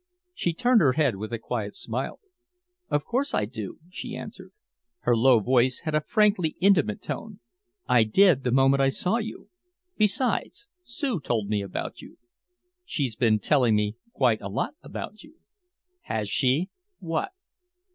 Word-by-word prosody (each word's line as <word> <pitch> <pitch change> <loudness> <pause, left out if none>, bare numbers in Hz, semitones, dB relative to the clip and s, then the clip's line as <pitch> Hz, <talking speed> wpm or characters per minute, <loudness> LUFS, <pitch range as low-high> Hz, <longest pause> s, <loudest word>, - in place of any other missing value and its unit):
She 175 - -1
turned 245 +1 +4
her 135 -5 +4
head 140 -9 +1
with 110 +3 -6
a 115 - -1
quiet 110 -2 -4
smile. 120 +4 -4 0.7
"Of 145 - 0
course 270 +4 -1
I 105 - +1
do," 110 -3 -7
she - - -6
answered. - - -9 0.5
Her 120 - +3
low 120 +1 +5
voice 125 +3 +2
had 155 -2 -3
a 155 - +2
frankly 200 -3 +2
intimate 175 - +3
tone. 215 -2 -6 0.5
"I 120 -2 +5
did 170 - +4
the 125 - 0
moment 135 +2 +4
I 135 - +4
saw 180 +10 0
you. 225 -1 -6 0.5
Besides, 250 - 0
Sue 280 - -2
told 110 -7 -2
me 105 -1 0
about 100 -2 -5
you." - - -14 0.7
"She's 140 - -2
been 110 -2 +3
telling 125 -1 +3
me 105 0 0 0.2
quite 120 - +2
a 100 - -5
lot - - -2
about 215 - -7
you." 305 +1 -17 0.7
"Has 110 -2 -2
she? 135 - +1 0.3
What?" 165 - -2
135 Hz, 155 wpm, -26 LUFS, -, 0.7 s, low